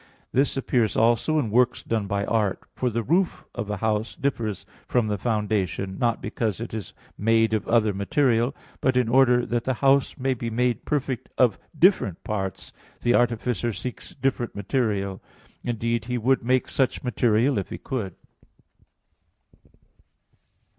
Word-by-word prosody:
This 135 +1 +1
appears 120 -4 +1
also 120 +7 +3
in 115 -8 0
works 125 +2 +2
done 110 -3 -1
by 100 +1 -1
art; 105 -4 0
for 125 - -1
the 115 0 -2
roof 175 - +1
of 115 -4 -4
a 105 - -2
house 110 +2 -1
differs 115 -7 -2 0.2
from 120 -3 +2
the 105 - 0
foundation, 100 -4 -1
not 120 -2 0
because 110 -1 -2
it 115 -1 -6
is 110 -4 -6 0.2
made 115 +1 +3
of 110 -2 -1
other 110 -3 +3
material; 120 +4 +1 0.2
but 130 -1 +2
in 125 -2 +3
order 125 0 +4
that 120 -1 -1
the 130 - 0
house 135 +1 +3
may 130 +1 0
be 120 -1 -4
made 120 +1 0
perfect 135 -4 -2
of 120 -6 +3 0.2
different 140 - +3
parts, 95 -4 -4 0.3
the 120 - +3
artificer 120 -1 +1
seeks 115 +6 -7
different 130 -3 -1
material; 100 -3 -1 0.4
indeed, 115 -1 -1
he 125 +1 -2
would 130 +2 +2
make 130 +1 +2
such 135 -2 0
material 120 0 +2
if 95 - -5
he - - -5
could. 105 -9 -4
115 Hz, 155 wpm, -25 LUFS, 105-125 Hz, 0.4 s, order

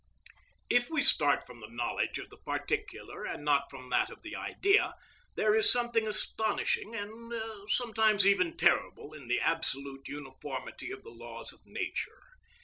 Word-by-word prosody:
If 245 0 +2
we 310 -3 0
start 150 - +8
from 120 - -13
the 110 -1 -10
knowledge 120 +1 -2
of - - -9
the - - -14
particular, - - -4
and 145 - -5
not 140 -1 +2
from 130 -2 -11
that 125 - +2
of - - -13
the - - -7
Idea, 400 +1 +1 0.4
there 215 0 +2
is 220 0 +4
something 235 -2 +1
astonishing, 230 - -1
and 225 +2 -7 0.4
sometimes 220 -4 +2
even 185 -4 +3
terrible, 160 -2 +1
in 145 -5 -11
the 120 - +1
absolute 140 -4 -2
uniformity 140 - -7
of 390 +1 -8
the 455 - -12
laws - - -9
of - - -21
nature. - - -5
200 Hz, 155 wpm, -30 LUFS, 140-235 Hz, 0.4 s, start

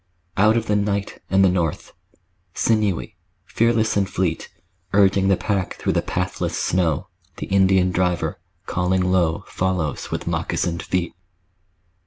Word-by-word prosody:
Out 110 +3 +4
of 115 - -1
the 105 - +1
night 100 -1 -1
and 95 0 +4
the 95 - +4
north, 85 -4 -2 0.6
Sinewy, 105 -6 0 0.3
fearless 115 0 +1
and 100 -1 +1
fleet, 90 -4 -2 0.4
Urging 100 -1 +4
the 95 -2 +3
pack 95 -4 -2
through - - -1
the - - +2
pathless 90 0 -2
snow, 85 -4 0 0.3
The - - -4
Indian 95 -1 +3
driver, 90 -3 0 0.3
calling 90 +1 0
low, 85 -3 +1
Follows 90 -6 -2
with - - -4
moccasined 85 -1 -1
feet. 90 -2 -2
95 Hz, 135 wpm, -22 LUFS, 90-100 Hz, 0.6 s, Out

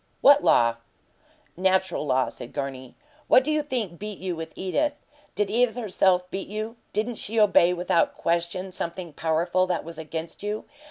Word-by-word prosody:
"What 285 +1 +7
law?" 115 -1 +4 0.8
"Natural 190 -1 +1
law," 130 -1 +2
said 120 - -10
Gurney. 130 -2 -5 0.3
"What 255 - +6
do 305 - -1
you 305 0 +2
think 235 - -4
beat 210 -1 -6
you 185 -1 -3
with 160 0 -6
Edith? 285 +11 0 0.4
Did 205 -1 0
Edith, 235 0 +2
herself, 190 -5 +2
beat 195 - -4
you? 215 +3 -5 0.2
Didn't 220 +2 -2
she 225 +2 0
obey 195 -4 +5
without 175 -1 +1
question 170 +3 -1
something 170 -2 -5
powerful 170 +4 +1
that 180 -1 -1
was 165 0 -9
against 160 +1 -6
you? 210 +1 -3
185 Hz, 165 wpm, -25 LUFS, 170-215 Hz, 0.8 s, What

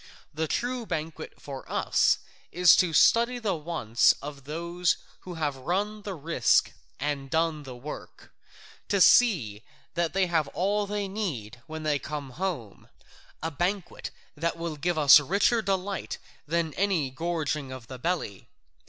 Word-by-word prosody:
The 160 +1 -1
true 245 +5 -2
banquet 160 -1 -5
for 135 -2 -9
us - - +3 0.3
is 180 0 +7
to 180 -3 +3
study 235 +9 +4
the 220 -5 -1
wants 155 -9 +2
of 140 -1 -9
those 170 +3 -1 0.2
who 180 -1 -8
have 150 -4 -1
run 200 +10 -2
the 200 -2 -5
risk 145 -7 +2 0.3
and 140 -1 -2
done 160 0 +1
the 130 -3 -9
work, 135 +5 -10 0.5
to 200 - +1
see 160 - +5 0.3
that 170 -1 -1
they 190 0 +3
have 165 -4 +1
all 205 +3 +1
they 205 0 -2
need 135 - -4
when 160 0 -6
they 150 -2 +1
come 140 -1 -6
home, 160 - -5 0.5
a 160 - -1
banquet 180 +5 -2 0.3
that 165 +3 -2
will 165 -2 -4
give 170 +3 -1
us 150 0 +9
richer 200 - +2
delight 195 -1 -2 0.3
than 165 -1 0
any 180 -8 0
gorging 150 -2 -2
of 130 -2 -8
the 130 +3 -9
belly. 160 - -3
165 Hz, 150 wpm, -27 LUFS, 145-190 Hz, 0.5 s, us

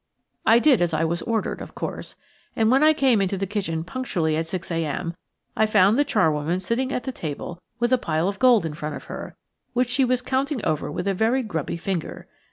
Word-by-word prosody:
I 225 - +7
did 255 -3 +4
as 170 -2 +1
I 155 - +1
was 170 +1 -1
ordered, 230 -3 -2
of - - -9
course, - - -5 0.4
and 225 0 +3
when 265 +2 +4
I 310 +1 +7
came 265 -8 +3
into 195 0 0
the 195 - -1
kitchen 185 -5 -2
punctually 175 -6 -1
at 160 +1 -1
six 175 0 -5
a.m. 165 +1 -2 0.4
I 220 - +3
found 210 -1 +4
the 290 - +4
charwoman 165 - +1
sitting 235 +7 -1
at 250 - -2
the 265 - -3
table 170 - -6 0.2
with 240 +1 +2
a 255 - +4
pile 160 -3 0
of 200 0 -3
gold 245 -8 +5
in 160 - -3
front 150 -1 -5
of - - -8
her, - - -8 0.4
which 250 0 +1
she 265 +2 +2
was 250 0 +1
counting 265 -1 -1
over 150 -2 -1
with 180 +5 -3
a 195 - +2
very 225 +7 +1
grubby 165 -7 -3
finger. 175 -1 -4
195 Hz, 220 wpm, -24 LUFS, 165-245 Hz, 0.4 s, I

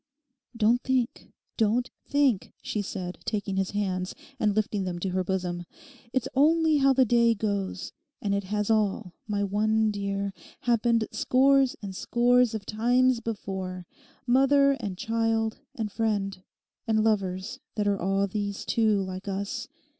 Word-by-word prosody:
'Don't 230 +2 +3
think, 255 -2 -1 0.3
don't 230 +3 +1 0.2
think,' 280 -8 +1
she 210 - -2
said, 185 -3 -5
taking 200 -2 -2
his 195 -1 0
hands, 185 -3 -2 0.2
and 210 -2 +2
lifting 210 -2 0
them 180 -2 -3
to 185 +2 -2
her 185 0 0
bosom. 180 -2 -2 0.5
'It's 260 0 0
only 315 +2 +4
how 275 -1 +4
the 265 -1 +4
day 235 0 +4
goes; 200 -3 -2 0.3
and 200 -1 -1
it 200 -1 -1
has 210 +2 -1
all, 210 -3 0
my 205 -1 0
one 215 +2 +2
dear, 200 -1 -2 0.3
happened 235 -1 +2
scores 270 0 +3
and 195 -2 -6
scores 245 +2 +3
of 205 -2 -5
times 245 +3 +2
before—mother 230 +7 0
and 200 -5 -4
child 225 +1 0 0.2
and 215 -3 -3
friend—and 215 +1 -2
lovers 195 -3 -1 0.2
that 210 -1 0
are 200 -1 +1
all 195 +2 +1
these 200 0 -3
too, 215 -3 +2
like 185 +1 -6
us. 200 +1 -3
210 Hz, 140 wpm, -27 LUFS, 195-235 Hz, 0.5 s, only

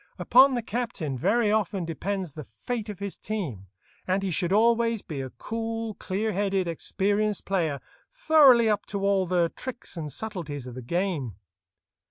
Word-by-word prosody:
Upon 260 +2 +6
the 240 - -2
captain 215 - -3
very 210 - +2
often 200 -4 0
depends 185 +2 -3
the 150 +2 -8
fate 225 - -5
of 205 - -6
his 200 0 -6
team, 155 - -4 0.4
and 190 +1 +1
he 190 - -1
should 175 +2 0
always 230 +1 +3
be 145 -4 -5
a 130 - -5
cool, 225 - -4
clear 205 +3 -2
headed, 195 -2 0
experienced 205 +5 0
player, 165 -7 0 0.3
thoroughly 300 - +6
up 210 -1 0
to 200 -1 -2
all 195 -2 +2
the 175 -1 +2
tricks 250 -6 -6
and 155 -3 -5
subtleties 165 - -5
of 125 - -8
the 130 - -7
game. 155 - -2
195 Hz, 165 wpm, -27 LUFS, 170-225 Hz, 0.4 s, Upon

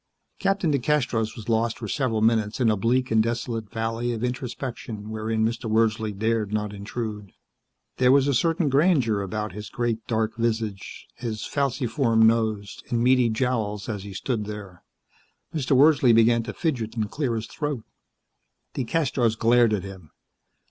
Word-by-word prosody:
Captain 195 -5 +1
DeCastros 125 -5 0
was 110 -3 -9
lost 115 0 +1
for 115 - -6
several 115 -2 0
minutes 110 -1 +2
in 120 -3 +4
a - - +2
bleak 125 +5 +1
and 110 0 +5
desolate 115 -1 -2
valley 115 +2 -2
of 115 0 -4
introspection 120 -3 -5
wherein 110 0 -1
Mr. 115 0 -2
Wordsley 110 0 +1
dared 110 0 -1
not 105 -1 -2
intrude. 105 0 -6 0.6
There 125 0 +4
was 140 0 +4
a 140 - +2
certain 165 +5 +1
grandeur 135 - +3
about 105 +1 -3
his 105 +2 -8
great, 120 -2 -2
dark 110 -1 0
visage, 110 -4 -3
his 110 -3 -4
falciform 125 -4 +1
nose 110 -3 +1
and 120 -1 +1
meaty 125 -1 +4
jowls 110 -3 -1
as 105 -4 -3
he 100 -1 -9
stood 110 0 -2
there. 100 -4 -8 0.7
Mr. 135 -4 +1
Wordsley 140 -4 +6
began 115 +1 +5
to 115 - -6
fidget 125 -9 -2
and 110 -3 -2
clear 135 -6 -1
his 110 0 -3
throat. 145 -3 -4 0.9
DeCastros 125 -4 0
glared 120 0 +4
at 105 -4 0
him. 95 -5 -10
115 Hz, 155 wpm, -25 LUFS, 110-125 Hz, 0.9 s, Wordsley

